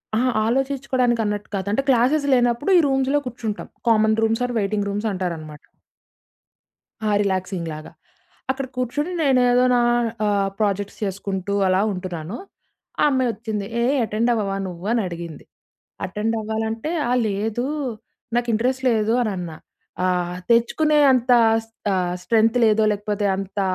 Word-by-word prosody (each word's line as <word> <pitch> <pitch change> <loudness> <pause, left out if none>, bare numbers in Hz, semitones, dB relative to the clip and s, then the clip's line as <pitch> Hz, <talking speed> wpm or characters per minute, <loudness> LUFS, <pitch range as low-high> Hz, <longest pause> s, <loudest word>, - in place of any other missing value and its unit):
అహా! 250 +3 +2 0.2
ఆలోచించుకోవడానికి 260 -1 0
అన్నట్టు 210 0 -3
కాదు. 195 0 -3
అంటే 220 - +1
క్లాసేస్ 265 +4 +3
లేనప్పుడు, 245 +6 +2
ఈ - - +7
రూమ్స్‌లో 270 +1 +1
కూర్చుంటాం. 225 -3 -5 0.2
Common 220 -1 +3
rooms 225 +2 +1
are 245 - -5
waiting 205 0 -1
rooms 205 +2 -2
అంటారన్నమాట. 165 -5 -5 1.4
ఆ! - - +1
రిలాక్సింగ్ 185 -3 -2
లాగా. 155 +1 -9 0.6
అక్కడ 270 0 -4
కూర్చొని 270 +7 -2
నేను 270 -3 +4
ఏదో 250 +1 +4
నా - - +4 0.5
ఆహ్, 200 -1 +1
ప్రాజెక్ట్స్ 205 -1 -1
చేసుకుంటూ 195 0 -3
అలా 185 +1 +3
ఉంటున్నాను. 180 +1 -5 0.6
ఆ - - +5
అమ్మాయి 260 -2 +1
వచ్చింది. 215 -3 -4 0.2
"ఏయ్! 265 +4 +2
అటెండ్ 220 +3 0
అవ్వవా 200 -4 -1
నువ్వు" 175 0 -8
అని 235 -1 +2
అడిగింది? 170 -3 -8 0.6
అటెండ్ 210 +4 -2
అవ్వాలంటే 220 +5 -3 0.2
ఆ! - - +1 0.2
లేదు, 215 +4 -2 0.7
నాకు 240 0 0
ఇంట్రెస్ట్ 255 +4 0
లేదు 220 0 +1
అని 220 -3 0
అన్నా. 170 -3 -6 0.5
"ఆహ్, 180 -1 -1
తెచ్చుకునే 300 +6 +3
అంత 250 0 +1 0.3
స్ - - -29 0.2
ఆహ్, 180 -1 0
స్ట్రెంత్ 225 +2 +3
లేదో 220 0 +3
లేకపోతే 205 0 -2
అంత 195 +1 -5
220 Hz, 140 wpm, -22 LUFS, 195-245 Hz, 1.4 s, ఈ